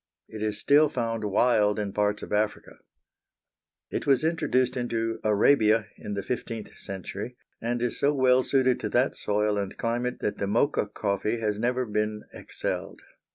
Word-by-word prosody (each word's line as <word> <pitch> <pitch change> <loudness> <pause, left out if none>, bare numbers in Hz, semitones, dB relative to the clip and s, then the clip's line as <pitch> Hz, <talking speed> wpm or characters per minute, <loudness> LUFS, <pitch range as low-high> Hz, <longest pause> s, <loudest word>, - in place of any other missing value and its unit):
It 110 - -8
is 105 -1 -1
still 145 +6 +4
found 115 -4 -2
wild 105 0 +3
in 100 -2 -3
parts 105 0 0
of - - -6
Africa. 105 0 -1 1.1
It - - -3
was 135 0 +4
introduced 130 -6 +1
into 115 -2 -2
Arabia 110 0 +4
in 105 - -6
the 100 - -3
fifteenth 115 -3 -5
century, 100 +5 -6 0.2
and 120 +1 -1
is 125 - -2
so 140 - +3
well 130 -2 +4
suited 130 -1 +2
to - - -3
that - - +2
soil 105 0 0
and 100 -1 -4
climate 120 +2 -1
that 105 - -2
the 100 - -1
Mocha 115 +2 +1
coffee 105 +2 -1
has 105 -2 -1
never 125 +2 0
been 105 -1 -2
excelled. - - -5
115 Hz, 160 wpm, -27 LUFS, 105-125 Hz, 1.1 s, still